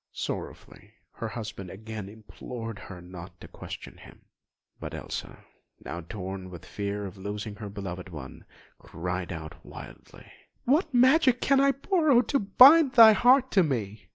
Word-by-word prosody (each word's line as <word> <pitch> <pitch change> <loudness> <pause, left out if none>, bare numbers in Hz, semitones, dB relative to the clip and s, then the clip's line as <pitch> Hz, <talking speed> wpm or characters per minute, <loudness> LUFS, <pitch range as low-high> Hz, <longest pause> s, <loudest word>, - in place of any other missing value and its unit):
Sorrowfully - - -7 0.2
her 115 - -6
husband 110 -4 -7
again 110 0 -8
implored 115 +1 -9
her 90 -3 -10
not 90 -1 -11
to - - -11
question - - -10
him; - - -16 0.5
but - - -7
Elsa, - - -7 0.4
now 85 - -5
torn 95 +1 -7
with 85 -3 -11
the - - -15
fear 100 0 -4
of 95 0 -9
losing 105 +2 -6
her 105 -2 -7
beloved 95 -2 -7
one, 75 -6 -10 0.4
cried 90 +2 -5
out 80 -2 -8
wildly: - - -13 0.4
"What 305 +5 +2
magic 255 0 +4
can 275 0 +3
I 275 0 +4
borrow 295 -3 +2
To 275 - 0
bind 265 +8 +7
thy 225 -2 +9
heart 255 +3 +4
to 195 - +4
me? 110 - -3
110 Hz, 155 wpm, -27 LUFS, -, 0.5 s, thy